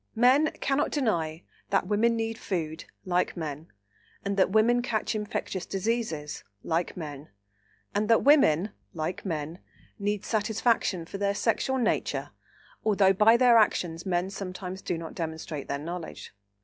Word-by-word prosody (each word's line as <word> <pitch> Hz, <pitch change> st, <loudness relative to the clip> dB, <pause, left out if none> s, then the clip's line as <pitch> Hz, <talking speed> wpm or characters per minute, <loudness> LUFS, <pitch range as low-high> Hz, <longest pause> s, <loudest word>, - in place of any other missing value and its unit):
Men 260 Hz, +7 st, +5 dB
cannot 275 Hz, +2 st, +1 dB
deny 170 Hz, -, -1 dB, 0.3 s
that 195 Hz, -1 st, +2 dB
women 215 Hz, +4 st, +2 dB
need 225 Hz, 0 st, -2 dB
food, 160 Hz, -4 st, -3 dB, 0.2 s
like 180 Hz, 0 st, 0 dB
men, 155 Hz, -1 st, -5 dB, 0.6 s
and 200 Hz, 0 st, 0 dB
that 190 Hz, -, +3 dB
women 225 Hz, +4 st, +4 dB
catch 230 Hz, -3 st, -1 dB
infectious 205 Hz, -3 st, -3 dB
diseases, 195 Hz, -7 st, -2 dB, 0.2 s
like 165 Hz, +3 st, -1 dB
men, 150 Hz, -3 st, -7 dB, 0.6 s
and 210 Hz, +1 st, 0 dB
that 225 Hz, -, +5 dB
women, 210 Hz, -, +5 dB, 0.2 s
like 160 Hz, +3 st, -3 dB
men, 160 Hz, -1 st, -3 dB, 0.4 s
need 205 Hz, 0 st, -1 dB
satisfaction 215 Hz, -4 st, +1 dB
for 195 Hz, -, -7 dB
their 200 Hz, 0 st, +1 dB
sexual 255 Hz, +5 st, +1 dB
nature, 235 Hz, -3 st, 0 dB, 0.5 s
although 200 Hz, -3 st, +4 dB
by 215 Hz, +4 st, +6 dB
their 240 Hz, -2 st, +6 dB
actions 170 Hz, -6 st, +1 dB
men 180 Hz, 0 st, -1 dB
sometimes 190 Hz, -1 st, -6 dB
do 175 Hz, -, -2 dB
not 165 Hz, -1 st, -7 dB
demonstrate 160 Hz, -3 st, -5 dB
their 140 Hz, -, -1 dB
knowledge. 165 Hz, -2 st, -7 dB
195 Hz, 140 wpm, -28 LUFS, 165-225 Hz, 0.6 s, by